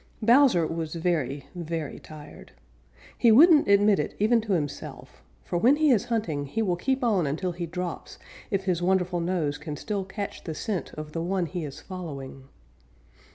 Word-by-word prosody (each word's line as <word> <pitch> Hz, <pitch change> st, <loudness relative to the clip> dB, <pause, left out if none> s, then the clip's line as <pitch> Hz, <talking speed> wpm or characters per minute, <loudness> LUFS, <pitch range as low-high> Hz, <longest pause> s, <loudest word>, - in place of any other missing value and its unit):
_ -, -, -2 dB
Bowser 240 Hz, -, +5 dB
was 165 Hz, 0 st, -4 dB
very, 155 Hz, -6 st, -1 dB
very 165 Hz, -3 st, -5 dB
tired. 150 Hz, -1 st, -13 dB, 0.6 s
He 235 Hz, -, +4 dB
wouldn't 300 Hz, +5 st, +7 dB
admit 200 Hz, 0 st, +4 dB
it -, -, -3 dB
even 225 Hz, +3 st, +3 dB
to 210 Hz, -2 st, -2 dB
himself, 150 Hz, -5 st, -5 dB, 0.2 s
for 175 Hz, -, -2 dB
when 250 Hz, +9 st, +5 dB
he 305 Hz, -1 st, +3 dB
is 220 Hz, -6 st, +2 dB
hunting 165 Hz, -12 st, -2 dB
he 225 Hz, +11 st, -1 dB
will 180 Hz, -4 st, +1 dB
keep 260 Hz, +9 st, -1 dB
on 200 Hz, -10 st, +2 dB
until 165 Hz, +6 st, -2 dB
he 175 Hz, 0 st, -5 dB
drops 180 Hz, +1 st, -6 dB, 0.3 s
if 195 Hz, -4 st, -1 dB
his 180 Hz, -3 st, 0 dB
wonderful 180 Hz, -1 st, +1 dB
nose 170 Hz, -4 st, -1 dB
can 150 Hz, -1 st, -6 dB
still 200 Hz, +5 st, -3 dB
catch 200 Hz, +1 st, -6 dB
the 160 Hz, -, -5 dB
scent 200 Hz, 0 st, -3 dB
of 155 Hz, 0 st, -7 dB
the 165 Hz, -, -3 dB
one 180 Hz, +1 st, -1 dB
he 175 Hz, 0 st, -5 dB
is 145 Hz, -2 st, -7 dB
following. 140 Hz, -8 st, -8 dB
180 Hz, 180 wpm, -26 LUFS, 155-210 Hz, 0.6 s, wouldn't